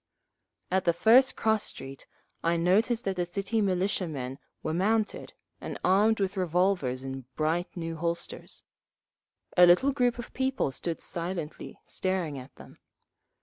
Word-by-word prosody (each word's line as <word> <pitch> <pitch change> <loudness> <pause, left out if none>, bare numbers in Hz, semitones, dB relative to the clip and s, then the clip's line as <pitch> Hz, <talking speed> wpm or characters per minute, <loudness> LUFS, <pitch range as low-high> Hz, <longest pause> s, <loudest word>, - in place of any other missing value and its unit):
At 190 0 +1
the 170 - +4
first 255 +6 +6
cross 220 -1 +1
street 135 0 -7 0.4
I 170 0 +2
noticed 215 +8 +2
that 190 -1 -1
the 180 - +1
City 200 +5 -1
Militiamen 180 -9 -1 0.2
were 155 - -1
mounted, 210 +5 0 0.3
and - - -5
armed 210 +4 +4
with 195 0 -1
revolvers 180 -7 +1
in 135 -1 -6
bright 160 +3 0
new 165 -1 -4
holsters; 170 +1 -3 0.9
a 180 -1 +8
little 215 +11 +5
group 245 -3 +1
of 240 - -8
people 265 - 0
stood 165 +4 -4
silently 170 -2 -5
staring 180 -7 -2
at 130 - -13
them. - - -15
180 Hz, 140 wpm, -28 LUFS, 165-210 Hz, 0.9 s, a